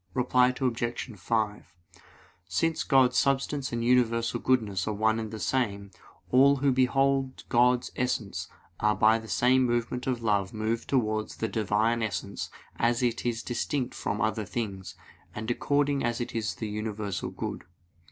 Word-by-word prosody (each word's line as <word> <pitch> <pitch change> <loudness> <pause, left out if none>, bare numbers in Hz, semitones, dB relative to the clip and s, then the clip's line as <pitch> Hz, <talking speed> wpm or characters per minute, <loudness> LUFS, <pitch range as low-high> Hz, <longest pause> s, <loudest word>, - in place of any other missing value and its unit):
Reply 125 0 +3
Obj. 120 -1 -2
5: 105 +1 -2 0.7
Since 160 - 0
God's 130 -3 +4
substance 140 0 0
and 115 -1 -2
universal 115 -2 +2
goodness 105 -8 +1
are 105 - -1
one 110 +2 +2
and 110 -1 -4
the 110 - -6
same, 100 -6 -1 0.4
all 140 +2 +6
who 140 0 +2
behold 135 +1 +1
God's 125 +1 +3
essence 120 -5 -2 0.3
are 105 0 +2
by 110 +3 +4
the 110 - -11
same 130 +3 +3
movement 120 +1 -1
of 125 -3 -1
love 100 -1 0
moved 110 +2 -2
towards 110 -5 0
the 110 - -1
Divine 110 +2 +1
essence 100 -2 -3 0.3
as 120 +1 +1
it 120 0 0
is 120 -1 -2
distinct 125 +1 -2
from 100 0 -3
other 110 0 0
things, 100 -3 -5 0.4
and 110 +2 -3
according 145 +2 +1
as 120 -1 -1
it 120 - -4
is 110 -2 -2
the 110 - -4
universal 105 -2 -3
good. - - -5
115 Hz, 150 wpm, -28 LUFS, 110-125 Hz, 0.7 s, all